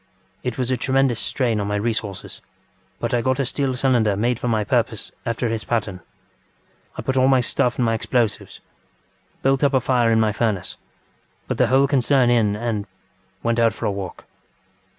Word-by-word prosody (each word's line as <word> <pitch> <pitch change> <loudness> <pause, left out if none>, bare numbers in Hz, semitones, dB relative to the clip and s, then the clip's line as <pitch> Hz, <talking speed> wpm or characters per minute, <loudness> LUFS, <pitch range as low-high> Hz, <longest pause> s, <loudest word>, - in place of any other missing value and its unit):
It 125 -2 -4
was 130 -1 -1
a 130 - +1
tremendous 130 -1 +1
strain 120 -6 0
on 100 - -2
my 105 - -1
resources, 105 -2 -3 0.6
but - - -2
I 120 - +2
got 130 +2 0
a 135 - +1
steel 135 0 -1
cylinder 120 -6 +2
made 120 +3 0
for - - -3
my 110 -2 +1
purpose 110 -1 -1 0.2
after 120 +1 -1
his 115 -1 -2
pattern. 105 -6 -2 1.0
I - - -4
put 130 0 -1
in - - +4
all 130 - +4
my 135 -1 +5
stuff 125 0 +1
and 125 - 0
my 115 - +1
explosives, 115 -1 -1 0.8
built 135 +1 +2
up 140 -1 +3
a - - +5
fire 125 -2 +2
in 110 - +3
my 110 -1 +2
furnace, 105 -4 -2 0.7
put - - -3
the - - +4
whole 135 +1 +4
concern 130 -2 +3
in, 110 -4 +3
andŌĆöwent 105 0 -5
out 115 -2 +3
for - - -6
a - - +1
walk. 100 -2 -7
120 Hz, 190 wpm, -22 LUFS, 105-130 Hz, 1.0 s, my